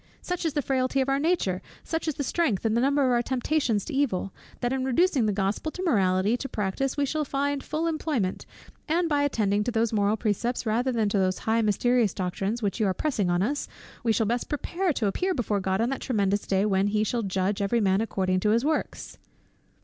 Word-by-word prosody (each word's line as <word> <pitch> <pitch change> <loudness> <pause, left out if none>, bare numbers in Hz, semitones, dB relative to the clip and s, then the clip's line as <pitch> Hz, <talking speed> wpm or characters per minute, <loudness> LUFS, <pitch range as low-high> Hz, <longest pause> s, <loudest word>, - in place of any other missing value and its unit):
Such 360 -1 -4
is 310 - -2
the 290 - 0
frailty 260 +1 0
of 265 - 0
our 275 0 +2
nature, 285 - 0 0.2
such 325 0 -3
the 295 -2 -1
strength 265 - 0
and 220 - +2
number 275 +4 +2
of 255 - +2
our 240 -1 +3
temptations 250 -3 0
to 315 - -6
evil, 225 -9 0 0.3
that 245 0 0
in 265 -1 -1
reducing 265 -2 +2
the - - +2
Gospel 200 +9 -1
morality 195 - +2
to 270 - -5
practice 215 +7 -2
we 285 - +2
shall 305 +2 -1
find 280 0 -1
full 315 +2 -2
employment: 305 - -1 0.4
and 335 +2 +1
by 295 -2 +1
attending 210 -7 +1
to 245 - -2
these 230 0 0
moral 205 0 +2
precepts, 235 +4 -1
rather 235 +4 +1
than 225 -3 +1
to 200 - +1
those 185 -1 +1
high 225 +1 +2
mysterious 225 0 +2
doctrines 195 +5 -2
which 205 +3 -1
you 215 - +2
are 190 - 0
pressing 225 - 0
on 175 +1 +2
us, 285 +7 -1 0.4
we 230 - +2
shall 220 +1 +2
best 240 +3 -1
prepare 345 +5 -1
to 240 - -1
appear 365 - 0
before 215 -6 0
God 190 0 -1
on 235 - +1
that 270 - -3
tremendous 205 -5 0
day, 195 +1 +2
when 195 -1 +2
'He 210 +1 +1
shall 235 +2 -1
judge 195 0 -1
every 200 +4 +1
man 195 -1 +2
according 185 -4 0
to 210 - +1
his 230 +5 +2
WORKS.'" 310 0 -2
230 Hz, 220 wpm, -26 LUFS, 200-280 Hz, 0.4 s, our